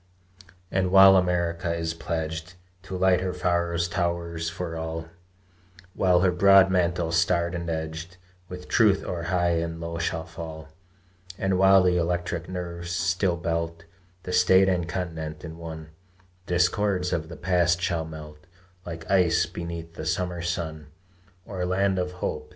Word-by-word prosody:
And 95 -1 +1
while 95 +1 +8
America 85 -2 0
is 80 -1 -2
pledged 80 +1 -4 0.3
To 95 -1 -6
light 90 -1 +3
her 90 -1 -2
Pharos 85 -1 0
towers 85 -2 -2
for 85 0 -5
all, 80 0 -4 0.9
While 90 -2 +3
her 90 -1 +3
broad 95 +1 +6
mantle, 85 -2 +1
starred 85 +1 +1
and 85 -1 -4
edged 80 +2 -5 0.3
With 90 0 -8
truth, 105 -4 +3
o'er 85 -2 -3
high 85 -1 +1
and 85 0 -4
low 85 0 -5
shall 80 -1 -2
fall; 80 -1 -8 0.7
And 95 -1 0
while 95 0 +6
the 90 -1 +3
electric 85 0 -2
nerves 85 -1 -5
still 90 +1 0
belt 85 0 -3 0.4
The 90 - -5
State 95 +1 +5
and 90 -2 -1
Continent 80 -4 -5
in 80 0 -8
one, 80 -1 -8 0.6
The - - -2
discords 90 +1 +1
of 80 -1 -2
the 85 - -9
past 90 -1 +2
shall 85 -2 -1
melt 75 +1 -10 0.4
Like 85 -1 -8
ice 90 -4 +3
beneath 85 -1 -7
the 80 - -7
summer 90 +1 -1
sun. 80 -3 -4 0.6
O - - -9
land 95 +1 +1
of 90 0 -2
hope! 75 -4 -4
85 Hz, 150 wpm, -26 LUFS, 80-90 Hz, 0.9 s, while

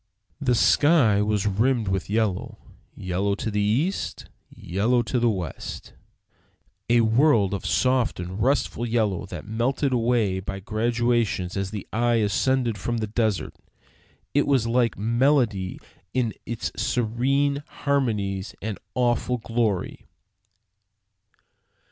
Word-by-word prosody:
The 125 -3 +2
sky 125 -5 +4
was 105 -1 0
rimmed 110 +3 +1
with 95 -1 -2
yellow; 105 -3 -1 0.4
yellow 95 +2 -1
to 110 - -3
the 105 0 0
east, 130 - -1 0.2
yellow 115 +7 0
to 125 +2 -1
the 120 0 +3
west; 90 -8 -5 1.0
a 120 0 +5
world 110 -3 +3
of 100 - -3
soft 125 +8 +1
and 90 +4 -5
restful 130 -1 +1
yellow 110 -6 0
that 90 -4 -8
melted 130 +5 0
away 115 -5 +1
by 95 +1 -5
gradations 115 -3 0
as 100 -1 -2
the 105 -2 -6
eye 120 +1 +2
ascended 115 +1 +1
from 120 +5 -2
the 110 - -1
desert. 110 -2 -1 0.8
It 145 - +2
was 135 -5 +3
like 120 0 +1
melody 115 -4 +1 0.4
in 120 -4 +1
its 115 -1 -3
serene 135 +5 0
harmonies 105 -9 -1
and 105 -1 -5 0.2
awful 125 0 +1
glory. 115 -4 -2
115 Hz, 120 wpm, -24 LUFS, 100-125 Hz, 1.0 s, a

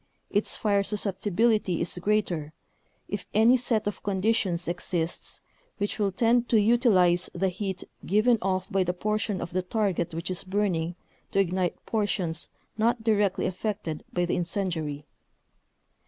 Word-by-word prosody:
its 205 +1 +1
fire 200 -2 +2
susceptibility 205 0 +1
is - - 0
greater, 175 -6 0 0.5
if 205 -1 -4
any 225 +4 +6
set 235 -3 0
of 205 - -3
conditions 190 -3 0
exists 175 -1 -3 0.4
which 205 +2 -2
will 200 -2 +2
tend 235 +4 +2
to 225 - +5
utilize 205 -6 +4
the 190 +2 +1
heat 190 0 -4 0.2
given 215 +4 +3
off 185 -1 0
by 195 0 +3
the 180 0 -2
portion 210 0 -1
of 170 - -5
the 185 - +1
target 185 -4 -1
which 165 +3 -3
is 185 - -1
burning 185 -4 0 0.3
to - - -3
ignite 185 -2 0
portions 185 -6 -1 0.3
not 230 +1 +2
directly 210 -4 +2
affected 185 -4 -3
by 175 0 +1
the 175 - 0
incendiary. 165 -5 -2
195 Hz, 140 wpm, -27 LUFS, 175-215 Hz, 0.5 s, any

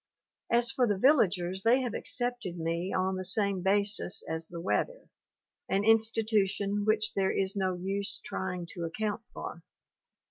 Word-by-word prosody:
As 235 0 +4
for 250 -2 +2
the 205 -2 +1
villagers 190 - +3
they 240 +5 +4
have 245 -3 -3
accepted 245 -8 -2
me 170 +3 -2
on 185 0 0
the 185 - -3
same 200 0 +1
basis 200 0 +1
as 160 0 -3
the 170 - -7
weather, - - -2 0.6
an 195 +1 +1
institution 210 -2 +2
which 215 0 +2
there 190 -1 +1
is 195 0 0
no 190 -2 0
use 195 +2 -2
trying 180 -2 -4
to 175 - -5
account 210 +6 -2
for. - - -7
200 Hz, 150 wpm, -30 LUFS, 185-220 Hz, 0.6 s, As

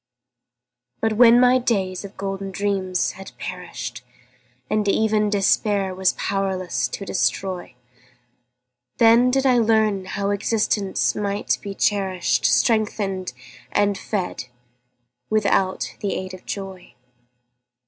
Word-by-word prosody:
But 225 -1 +1
when 235 +1 +7
my 250 +1 +5
days 195 -7 -1
of 200 0 -10
golden 195 0 -4
dreams 190 -2 -1
had 195 0 -11
perished, 125 -10 -6 0.7
And 210 +4 0
even 215 +1 +2
Despair 200 -1 +1
was 185 0 +1
powerless 185 -10 -1
to 195 +10 -6
destroy, 185 -5 -2 1.2
Then 235 +2 +6
did 270 +1 +1
I 250 -2 +4
learn 220 -4 +2
how 200 +1 -2
existence 205 -1 0
might 200 0 -1
be 200 -1 -6
cherished, 185 -12 0
Strengthened 195 - +1 0.4
and 205 0 +2
fed 190 - -4 0.8
without 200 -3 +1
the 200 -3 -2
aid 185 0 -5
of 185 - -12
joy. 190 -8 -7
195 Hz, 110 wpm, -22 LUFS, 185-215 Hz, 1.2 s, when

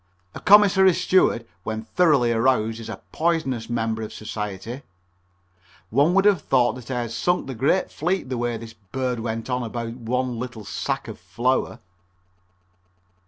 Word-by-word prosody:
A - - -7
commissary 190 -1 +6
steward 185 -10 +2 0.2
when 110 +3 -4
thoroughly 140 -2 +3
aroused 115 -1 +1
is 115 - -8
a 105 -4 -8
poisonous 155 -9 -1
member 115 -1 -1
of 110 - -5
society. 105 +4 -6 1.1
One 145 - +3
would 195 0 +4
have 200 -6 +4
thought 125 -3 +2
that 125 -1 -11
I 125 -2 -1
had 115 -1 -5
sunk 175 +9 0
the 135 - -5
great 135 +10 +1
fleet 175 +1 -1
the 130 -1 -3
way 120 -1 -1
this 115 0 -10
bird 120 +4 -4
went 115 0 -4
on 125 -1 -1
about 115 0 -4
one 125 0 -2
little 120 -4 -6
sack - - -3
of - - -8
flour. 130 +2 -1
120 Hz, 160 wpm, -23 LUFS, 115-145 Hz, 1.1 s, commissary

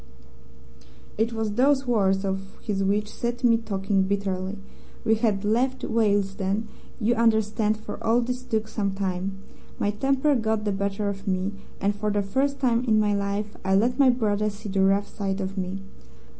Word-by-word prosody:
"It 225 +2 +1
was 225 -2 -2
those 270 +5 +3
words 195 -5 +2
of 195 0 -4
his 195 -3 -2
which 205 +2 +1
set 240 +3 -4
me 230 -2 +5
talking 195 -3 0
bitterly. 190 0 -1 0.5
We 220 - +4
had 215 -3 +1
left 255 +5 +1
Willesden, 205 -1 +1 0.3
you 235 +1 +2
understand, 220 -2 +2
for 215 +1 -8
all 230 +2 +3
this 250 +1 -3
took 220 -3 -2
some 200 -3 -2
time. 190 0 -2 0.4
My 205 - +1
temper 270 +7 +2
got 220 -3 0
the 205 - +1
better 200 +1 -1
of 200 -1 -4
me, 190 +1 0 0.3
and 200 +1 +1
for 210 +1 -1
the 205 0 +1
first 275 +7 0
time 240 -2 +2
in 220 -3 +4
my 210 -1 +2
life 200 +1 -2
I 190 0 +2
let 240 +6 +2
my 270 -2 +7
brother 215 -4 +1
see 210 +1 -8
the 195 0 +1
rough 195 +1 +3
side 195 -1 -3
of 190 0 -3
me. 190 0 -3
210 Hz, 175 wpm, -25 LUFS, 195-230 Hz, 0.5 s, my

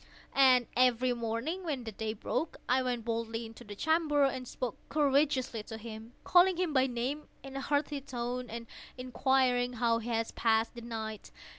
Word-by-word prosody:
And 255 -3 +6
every 250 0 +3
morning, 235 +10 -3
when 290 -7 -2
the 225 - -5
day 215 +1 -3
broke, 305 +8 -3
I 260 +1 +3
went 245 -3 -2
boldly 230 0 -2
into 225 +2 -11
the 205 -2 -9
chamber, 310 +2 +2
and 260 -2 0
spoke 245 -3 -4
courageously 280 -5 +2
to 220 +1 -8
him, 225 +1 -9
calling 360 0 +5
him 355 -4 0
by 260 -1 +4
name 255 +5 -3 0.2
in 270 0 -9
a 275 - -2
hearty 285 0 0
tone, 250 -2 -4
and 230 +1 -6 0.3
inquiring 250 -1 +2
how 230 -1 +2
he 230 +1 -6
has 225 -1 0
passed 225 -1 +2
the 240 - -8
night. 220 -2 -6
250 Hz, 175 wpm, -31 LUFS, 230-275 Hz, 0.3 s, And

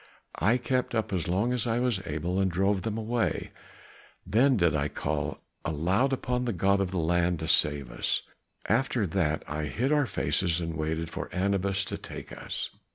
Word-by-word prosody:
I 110 +9 +4
kept 125 -1 -1
up 110 -3 -1
as 85 -4 0
long 100 +8 +1
as 120 -2 0
I 115 0 +1
was 120 -6 +1
able 85 +5 -1
and 95 -1 +3
drove 95 +2 +1
them 110 +1 -2
away, 115 +1 -1 0.7
then 125 +7 +4
did 85 -5 +3
I 70 -1 +1
call 75 -2 -2 0.3
aloud 90 - +1
upon 125 -1 -1
the 120 - 0
god 100 +2 +3
of 95 - 0
the 95 - -3
land 85 +1 +2
to 80 - -2
save 70 -5 +2
us; - - 0 0.4
after 120 0 +2
that 80 -4 0
I 75 0 -2
hid 125 - -1
our 145 -3 +3
faces, 90 -6 0
and 80 -1 -3
waited 80 +1 -2
for - - -5
Anubis 100 +1 +1
to - - -4
take - - -8
us." - - -4
95 Hz, 185 wpm, -28 LUFS, 80-115 Hz, 0.7 s, I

